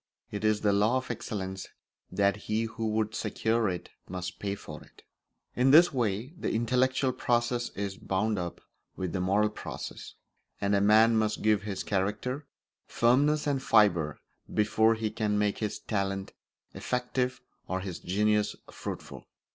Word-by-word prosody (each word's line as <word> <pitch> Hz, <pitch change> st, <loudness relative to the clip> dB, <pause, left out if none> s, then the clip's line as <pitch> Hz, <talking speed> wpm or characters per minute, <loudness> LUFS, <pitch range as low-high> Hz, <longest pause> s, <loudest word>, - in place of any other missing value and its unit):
It 105 Hz, 0 st, -4 dB
is 110 Hz, -1 st, +2 dB
the 105 Hz, -1 st, +3 dB
law 105 Hz, +5 st, +3 dB
of 130 Hz, -, -3 dB
excellence 95 Hz, -4 st, -5 dB, 0.4 s
that 100 Hz, 0 st, +2 dB
he 110 Hz, +2 st, -2 dB
who 115 Hz, 0 st, -3 dB
would 110 Hz, 0 st, 0 dB
secure 110 Hz, 0 st, 0 dB
it 90 Hz, -1 st, -5 dB, 0.2 s
must 90 Hz, 0 st, -5 dB
pay 100 Hz, -1 st, -2 dB
for -, -, -10 dB
it. -, -, -21 dB, 0.5 s
In 125 Hz, +2 st, +3 dB
this 165 Hz, +4 st, +7 dB
way 120 Hz, -, -1 dB
the -, -, -1 dB
intellectual 130 Hz, +3 st, +1 dB
process 120 Hz, -1 st, 0 dB
is 100 Hz, -1 st, -3 dB
bound 105 Hz, +2 st, 0 dB
up 85 Hz, -1 st, -5 dB, 0.3 s
with 95 Hz, -2 st, -3 dB
the 95 Hz, -, -1 dB
moral 100 Hz, +3 st, +2 dB
process, -, -, -7 dB, 0.4 s
and 100 Hz, +1 st, +1 dB
a 100 Hz, -, +3 dB
man 110 Hz, +3 st, +6 dB
must 110 Hz, -1 st, -1 dB
give 105 Hz, -2 st, +3 dB
his 100 Hz, -2 st, -4 dB
character 105 Hz, +9 st, -2 dB, 0.4 s
firmness 145 Hz, +6 st, +3 dB
and 140 Hz, -2 st, 0 dB
fibre 85 Hz, -, +3 dB, 0.3 s
before 110 Hz, +1 st, +3 dB
he 110 Hz, -1 st, -2 dB
can 105 Hz, -1 st, 0 dB
make 105 Hz, -1 st, +1 dB
his 105 Hz, -1 st, -2 dB
talent 100 Hz, -2 st, -2 dB, 0.4 s
effective 125 Hz, 0 st, -1 dB, 0.3 s
or 95 Hz, 0 st, -2 dB
his 95 Hz, -3 st, -5 dB
genius 105 Hz, +3 st, +1 dB, 0.2 s
fruitful. -, -, -7 dB
105 Hz, 155 wpm, -29 LUFS, 100-120 Hz, 0.5 s, this